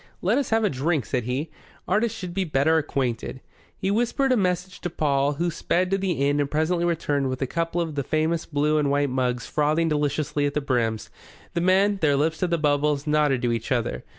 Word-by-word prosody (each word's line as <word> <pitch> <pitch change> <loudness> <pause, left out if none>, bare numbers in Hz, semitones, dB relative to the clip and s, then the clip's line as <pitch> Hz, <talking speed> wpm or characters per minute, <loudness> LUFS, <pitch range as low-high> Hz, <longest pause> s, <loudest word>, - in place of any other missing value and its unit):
"Let 210 +9 +3
us 280 - -2
have 225 0 +2
a 210 - +3
drink," 140 0 0
said 125 -1 -2
he. 135 +6 -3 0.4
"Artists 220 +4 +1
should 180 -4 -6
be 195 +1 0
better 160 0 +2
acquainted." 130 -4 -3 0.4
He 190 - -1
whispered 240 +5 +1
a - - +5
message 180 -3 -1
to 175 - -2
Paul, 145 -3 +1
who 170 +4 -1
sped 180 +3 0
to 195 - +3
the 190 -2 0
inn 145 +1 +1
and 145 -1 0
presently 165 +3 0
returned 145 -5 0
with 130 0 -3
a - - +1
couple 165 +5 -2
of 165 -2 -2
the 145 - -1
famous 160 +4 -1
blue 150 0 +1
and 145 -2 +1
white 140 -1 +1
mugs 125 -2 -1
frothing 155 +2 +1
deliciously 150 0 0
at 145 - -5
the - - +2
brims. 120 -6 -1 0.4
The 170 - 0
men, 195 +3 +3
their 145 -3 +3
lips 155 +3 0
to 180 - +1
the 170 0 +1
bubbles, 145 -1 +1
nodded 150 -4 +2
to 120 - +2
each 115 +1 -3
other. 115 - -1
150 Hz, 220 wpm, -24 LUFS, 140-175 Hz, 0.4 s, a